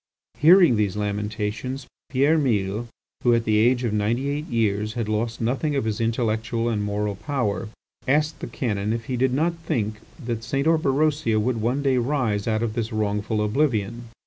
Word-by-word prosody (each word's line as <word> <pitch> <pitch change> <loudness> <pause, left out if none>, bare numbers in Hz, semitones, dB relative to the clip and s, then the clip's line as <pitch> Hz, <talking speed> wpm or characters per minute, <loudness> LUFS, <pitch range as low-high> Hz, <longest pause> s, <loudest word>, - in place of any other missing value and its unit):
Hearing 165 - +7
these 105 -2 0
lamentations, 105 +5 -3 0.2
Pierre 145 +5 +3
Mille, 110 -4 0 0.3
who 120 -1 +4
at 115 - +1
the 110 -1 +2
age 120 +3 +3
of 115 -3 -1
ninety 115 +6 0
eight 150 +2 -3
years 105 -2 0
had 115 -2 -2
lost 110 +2 -1
nothing 135 +6 0
of 135 - +1
his 110 0 -2
intellectual 115 0 0
and 110 -3 -1
moral 105 0 -1
power, 110 -4 -2 0.4
asked, 150 +3 +1
the - - -5
canon 105 -3 -2
if 115 0 -4
he 130 - -2
did 130 +1 +2
not 160 +6 +1
think 110 -8 -2 0.2
that 120 -6 -4
St. 135 +4 -1
Orberosia 150 -6 +2
would 115 +1 0
one 125 +5 0
day 130 -2 +3
rise 120 -6 0
out 110 0 +1
of 110 -2 -1
this 115 -1 -2
wrongful 105 0 -1
oblivion. 115 -2 0
115 Hz, 175 wpm, -24 LUFS, 105-135 Hz, 0.4 s, Hearing